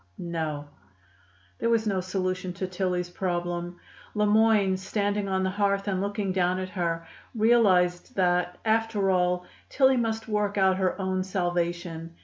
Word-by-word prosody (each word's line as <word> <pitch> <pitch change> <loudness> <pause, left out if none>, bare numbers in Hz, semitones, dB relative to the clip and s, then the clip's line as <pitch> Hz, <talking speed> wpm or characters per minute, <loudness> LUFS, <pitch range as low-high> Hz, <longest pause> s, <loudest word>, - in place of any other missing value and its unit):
"No." 160 -4 -3 0.9
There 230 - 0
was 230 -1 +2
no 195 -3 0
solution 185 -1 -2
to 185 +1 -3
Tillie's 180 -1 -2
problem. 175 -1 -3 0.4
Le 210 0 +2
Moyne, 210 -2 +4
standing 200 +1 -1
on 190 0 0
the 190 - 0
hearth 200 0 0
and 190 -2 0
looking 200 -1 -2
down 185 -1 +1
at 185 0 -4
her, 170 -3 -2 0.3
realized 200 -6 +3
that, 180 -1 +1
after 220 -3 +2
all, 180 -1 +1 0.2
Tillie 265 -1 +4
must 225 -2 -1
work 210 -1 -1
out 190 -1 +3
her 190 +1 0
own 185 -1 -1
salvation. 175 -2 -2
185 Hz, 145 wpm, -27 LUFS, 180-205 Hz, 0.9 s, Moyne